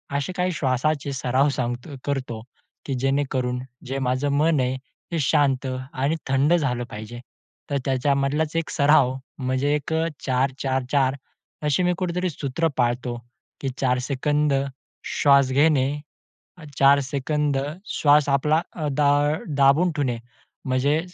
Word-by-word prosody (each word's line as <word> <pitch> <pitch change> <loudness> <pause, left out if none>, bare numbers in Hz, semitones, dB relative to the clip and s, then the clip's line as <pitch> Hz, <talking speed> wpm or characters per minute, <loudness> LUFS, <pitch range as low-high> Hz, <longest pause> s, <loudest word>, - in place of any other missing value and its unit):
असे 140 +6 -2
काही 180 0 +1
श्वासाचे 140 +1 0
सराव 130 +2 +1
सांगतो 125 +3 -4
करतो 130 -5 -3 0.4
की 140 - -2
जेणेकरून 130 -2 0 0.3
जे 135 +2 -3
माझं 130 +3 0
मन 155 0 +3
आहे, 130 0 0 0.3
ते 170 - -1
शांत 135 -1 +2 0.3
आणि 140 +5 0
थंड 135 +4 +3
झालं 130 -8 +1
पाहिजे. 110 +3 -8 0.5
तर 140 - 0
त्याच्यामधलाच 140 +3 0
एक 165 -1 -1
सराव 140 -3 +4 0.3
म्हणजे 130 +2 0
एक 150 +2 -3 0.3
4-4-4 130 0 0 0.5
अशी 150 +5 +2
मी 180 0 +2
कुठेतरी 180 +1 -1
सूत्र 145 +1 -1
पाळतो 120 0 0 0.4
की 135 - -1
4 125 -2 +2
सेकंद 145 +3 0 0.5
श्वास 140 -2 +4
घेणे, 140 -1 +3 0.9
4 140 +1 +6
सेकंद 140 +1 -1 0.3
श्वास 145 -1 +3
आपला 150 +3 +2
अ, 155 -3 -3
दा 145 +1 +2 0.5
दाबून 140 +6 +4
ठेवणे, 130 -6 0 0.5
म्हणजे 135 +4 +2
140 Hz, 125 wpm, -24 LUFS, 130-150 Hz, 0.9 s, 4